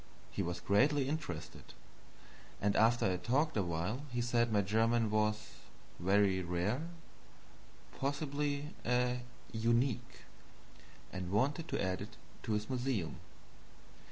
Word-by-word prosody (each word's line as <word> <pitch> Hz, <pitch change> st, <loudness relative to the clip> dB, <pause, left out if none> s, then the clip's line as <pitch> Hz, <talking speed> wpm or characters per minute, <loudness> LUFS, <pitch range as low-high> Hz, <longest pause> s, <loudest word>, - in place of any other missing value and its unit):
He -, -, -2 dB
was 85 Hz, 0 st, -2 dB
greatly 130 Hz, -, +3 dB
interested; 85 Hz, -, -5 dB, 0.8 s
and 100 Hz, 0 st, +1 dB
after 115 Hz, +2 st, +4 dB
I -, -, +4 dB
had 90 Hz, -1 st, -2 dB
talked 150 Hz, +6 st, +2 dB
a 105 Hz, -, +3 dB
while 90 Hz, -, -2 dB
he 120 Hz, -, -1 dB
said 120 Hz, -1 st, +2 dB
my 105 Hz, -1 st, +4 dB
German 115 Hz, +2 st, +2 dB
was 105 Hz, 0 st, +1 dB, 0.5 s
very 95 Hz, +1 st, +3 dB
rare, 90 Hz, -, 0 dB, 1.2 s
possibly 145 Hz, +1 st, -1 dB
a 125 Hz, 0 st, +1 dB, 0.3 s
"unique"; 120 Hz, +3 st, 0 dB, 0.9 s
and 90 Hz, -2 st, -4 dB
wanted 140 Hz, -, +1 dB
to -, -, -2 dB
add 95 Hz, -1 st, -1 dB
it -, -, -8 dB, 0.2 s
to 110 Hz, -, -2 dB
his 105 Hz, 0 st, -1 dB
museum. 125 Hz, -9 st, -1 dB
115 Hz, 125 wpm, -35 LUFS, 100-130 Hz, 1.2 s, after